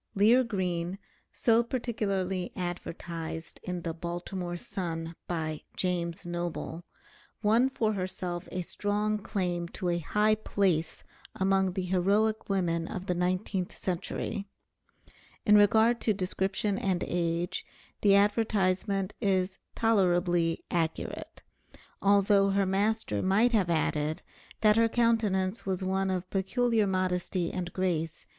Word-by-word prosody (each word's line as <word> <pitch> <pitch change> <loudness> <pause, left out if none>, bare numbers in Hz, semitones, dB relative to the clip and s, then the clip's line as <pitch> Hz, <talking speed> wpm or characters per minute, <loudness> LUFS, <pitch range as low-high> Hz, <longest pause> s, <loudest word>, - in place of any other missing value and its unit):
Lear 225 +6 +5
Green, 185 -5 -2 0.3
so 230 -1 +3
particularly 200 -7 -2
advertised 170 -2 -5
in 180 -1 -4
the 165 - -2
"Baltimore 175 +1 -4
Sun" 165 -2 -4
by 155 -3 -3 0.2
"James 175 -1 -2
Noble," 175 -1 -4 0.6
won 230 +5 +4
for 220 -5 0
herself 185 -2 -4
a 180 -1 -2
strong 210 +3 -1
claim 180 -4 -2
to 180 +1 -3
a 175 0 +1
high 210 +6 +2
place 190 -6 0 0.3
among 190 -1 +2
the 190 0 -2
heroic 200 +5 +1
women 170 -4 0
of 185 - -5
the 180 - 0
nineteenth 180 +1 -1
century. 195 +3 -3 1.0
In 210 - +6
regard 220 +3 +5
to 215 - +2
description 190 +2 -1
and 185 -2 0
age 170 0 -1 0.4
the 200 -1 +6
advertisement 200 -2 +2
is 190 -2 +1 0.2
tolerably 175 -6 +2
accurate, 165 -2 -3 0.6
although 200 0 +4
her 195 0 +2
master 195 - 0
might 215 +6 +3
have 195 -6 +3
added, 155 -2 0 0.4
that 215 0 +5
her 230 0 +4
countenance 220 -5 +1
was 190 -1 -1
one 190 +1 0
of 185 -1 -2
peculiar 220 +2 +1
modesty 185 -2 -1
and 175 -1 -3
grace. 165 -4 -2
190 Hz, 120 wpm, -29 LUFS, 175-205 Hz, 1.0 s, In